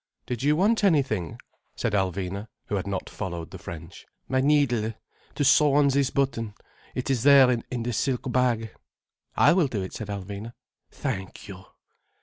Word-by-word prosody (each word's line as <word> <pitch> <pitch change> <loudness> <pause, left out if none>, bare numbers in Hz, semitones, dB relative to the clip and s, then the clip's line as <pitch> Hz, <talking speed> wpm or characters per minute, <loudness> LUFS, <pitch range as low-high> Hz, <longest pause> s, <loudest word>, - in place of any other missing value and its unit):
"Did 120 -2 -4
you 145 +2 +3
want 210 +6 +2
anything?" 135 - +1 0.4
said 110 - -2
Alvina, 95 +1 -1 0.2
who 105 - -3
had 95 0 -2
not 95 -1 -3
followed 85 -5 -6
the - - -9
French. 85 +1 -10 0.2
"My 130 0 +1
needle, 130 -6 +2 0.4
to 145 - 0
sew 145 +1 +5
on 145 -1 +5
this 140 -1 +2
button. 115 -6 -1 0.4
It 130 +1 -2
is 125 -4 +1
there, 135 -1 +7
in 120 0 -3
the 120 +1 -2
silk 130 +2 -1
bag." 120 -4 +1 0.7
"I - - +6
will 175 -5 +3
do 105 -7 -3
it," 95 - -7
said 110 - -6
Alvina. 100 +3 -6 0.4
"Thank 95 -10 -5
you." 95 -1 -10
120 Hz, 165 wpm, -26 LUFS, 100-140 Hz, 0.7 s, there